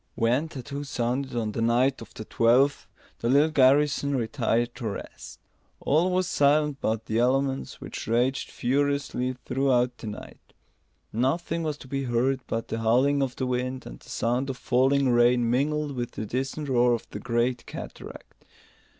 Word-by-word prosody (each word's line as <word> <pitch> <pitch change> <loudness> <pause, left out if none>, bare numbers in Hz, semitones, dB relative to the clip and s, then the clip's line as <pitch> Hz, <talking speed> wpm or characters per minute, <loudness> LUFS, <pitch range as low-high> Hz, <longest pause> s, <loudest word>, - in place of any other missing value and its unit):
When 125 +7 +1
tattoo 140 0 -6
sounded 130 0 -2
on 110 -2 -1
the 115 - -3
night 125 +3 +2
of 115 - -11
the 110 - -7
twelfth, 125 +7 +2 0.3
the 115 - -1
little 145 +4 +4
garrison 140 0 +3
retired 120 -1 0
to 120 - -5
rest. 100 - -8 0.4
All 160 +6 +2
was 185 0 +1
silent 145 0 +2
but 110 0 -1
the 110 +1 0
elements, 135 +2 0
which - - -7
raged 125 +4 +1
furiously 140 -1 -1
throughout 125 -2 +1
the 110 - -7
night. 105 - -10 0.6
Nothing 160 +8 0
was 155 -2 -2
to 135 - -13
be 135 +1 -3
heard 125 +2 +1
but 115 0 -3
the 115 - -2
howling 130 +6 +3
of 130 -2 -1
the 130 - -2
wind 125 0 -2
and - - -9
the - - -17
sound 125 +4 -1
of 130 - -4
falling 135 +3 +2
rain 120 0 +4
mingled 145 +4 0
with 120 -1 -4
the 110 - -4
distant 135 +6 -3
roar 120 -2 +3
of 115 - -8
the - - -6
great 120 +1 -1
cataract. - - -10
130 Hz, 165 wpm, -26 LUFS, 120-140 Hz, 0.6 s, little